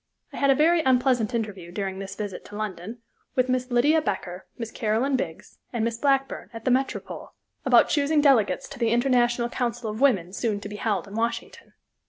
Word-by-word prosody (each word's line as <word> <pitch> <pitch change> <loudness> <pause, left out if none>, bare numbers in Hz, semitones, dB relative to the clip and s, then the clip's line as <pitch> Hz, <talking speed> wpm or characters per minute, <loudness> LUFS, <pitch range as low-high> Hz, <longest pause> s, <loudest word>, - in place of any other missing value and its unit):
I - - -7
had 280 - +2
a 270 - +6
very 330 +4 +4
unpleasant 250 -4 +2
interview, 200 -6 -4
during 190 0 -4
this 195 0 -6
visit 205 -3 -5
to 205 - -11
London, 215 +2 -6 0.3
with 255 0 +2
Miss 255 0 0
Lydia 290 +6 +3
Becker, 180 - -4
Miss 230 -2 -5
Caroline 230 +5 0
Biggs, 165 -10 -5
and 230 -2 -1
Miss 230 0 -2
Blackburn, 270 -6 0
at 225 -1 -9
the 255 - +3
Metropole, 265 +2 -2 0.3
about - - +6
choosing 295 +1 +2
delegates 270 -8 +3
to - - -10
the 230 -2 +2
International 240 0 +2
Council 240 -2 -3
of 215 +4 -7
Women 190 -11 +3
soon 210 -1 -1
to 205 - -6
be 210 - -7
held 205 -2 -1
in 200 - -11
Washington. 230 +2 -3
235 Hz, 195 wpm, -25 LUFS, 210-260 Hz, 0.3 s, a